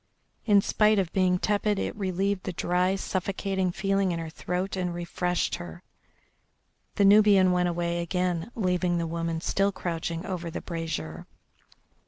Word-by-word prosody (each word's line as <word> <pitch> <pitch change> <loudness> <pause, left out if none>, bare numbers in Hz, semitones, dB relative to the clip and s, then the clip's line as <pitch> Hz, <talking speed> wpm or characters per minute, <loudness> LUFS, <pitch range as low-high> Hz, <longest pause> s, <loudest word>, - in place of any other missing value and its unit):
In 205 -2 +6
spite 215 +1 +3
of 185 -4 0
being 185 -1 +3
tepid 210 +1 0
it - - -2
relieved 195 0 -1
the 185 - -3
dry, 180 +2 +1
suffocating 190 -1 -2
feeling 195 0 0
in 170 - -2
her 165 -1 -5
throat 180 +4 -3
and 180 -2 -2
refreshed 175 +1 -1
her. 175 +1 -9 1.1
The 200 - +3
Nubian 200 -2 +6
went 180 0 +2
away 170 0 -1
again, 180 +1 -1
leaving 180 -4 +1
the 170 - -1
woman 165 0 -3
still 195 +3 +1
crouching 170 -2 -4
over 175 -3 -4
the 165 - -5
brazier. 160 - -5
180 Hz, 150 wpm, -27 LUFS, 170-195 Hz, 1.1 s, In